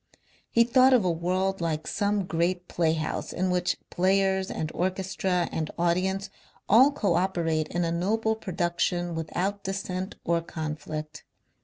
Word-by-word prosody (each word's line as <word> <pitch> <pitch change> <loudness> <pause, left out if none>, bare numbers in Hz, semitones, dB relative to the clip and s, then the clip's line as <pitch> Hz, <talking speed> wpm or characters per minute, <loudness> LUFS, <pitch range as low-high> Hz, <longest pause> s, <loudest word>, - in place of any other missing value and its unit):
He 230 - +5
thought 255 +2 +5
of 235 -7 +4
a 180 - +3
world 185 +3 -1
like 160 -2 -1
some 205 -1 0
great 175 +1 -1
playhouse 160 -2 -1
in 185 +1 0
which 180 0 +1
players 190 +1 +2
and 155 0 -3
orchestra 185 -1 -1
and 155 -1 -2
audience 190 +3 0 0.4
all 255 +7 +7
co 205 -10 0
operate 165 -3 0
in 175 0 -1
a 165 - -1
noble 220 +6 0
production 175 -3 -1
without 180 +5 -2
dissent 190 -1 -4
or 170 0 +2
conflict. 155 -1 -6
180 Hz, 140 wpm, -27 LUFS, 170-195 Hz, 0.4 s, all